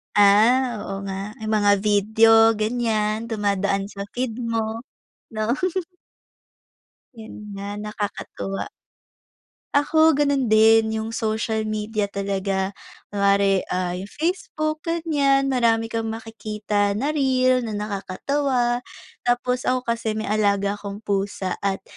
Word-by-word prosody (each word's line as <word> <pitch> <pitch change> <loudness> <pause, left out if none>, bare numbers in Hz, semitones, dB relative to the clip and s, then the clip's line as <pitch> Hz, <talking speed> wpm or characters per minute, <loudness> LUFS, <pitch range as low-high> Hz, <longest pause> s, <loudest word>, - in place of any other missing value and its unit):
Ah, 220 +4 +4
oo 195 - -5
nga. 195 -1 -4 0.3
Yung 215 0 -3
mga 205 -1 +4
video 215 +2 +4 0.3
ganyan, 215 0 -1
dumadaan 200 -2 -1
sa 200 0 -6
feed 245 -1 -3
mo, 225 -1 -2 0.5
'no? 215 +1 -1 1.6
Yun 225 -1 -10 0.2
nga, 200 0 -6
nakakatuwa. 205 -2 -5 1.1
Ako 315 +2 +4
ganun 280 -3 +1
din, 220 0 +5
yung 220 +1 -3
social 220 -1 -1
media 215 -1 -2
talaga. 195 -1 -2 0.4
Kunwari, 200 -1 +2
ah, 180 -1 -1
yung 195 - -7
Facebook 310 - -2
ganyan, 285 -5 +2
marami 230 -2 +2
kang 225 -1 -2
makikita 210 -2 -2
na 275 +7 0
reel, 255 -3 +2
na 215 - -4
nakakatawa. 240 +5 -1 0.5
Tapos 250 +1 0
ako 255 0 +1
kasi 230 -2 -2
may 220 - -3
alaga 205 -1 +1
akong 200 +1 -7
pusa 200 -2 -2
at 195 -1 -2
220 Hz, 115 wpm, -23 LUFS, 200-245 Hz, 1.6 s, din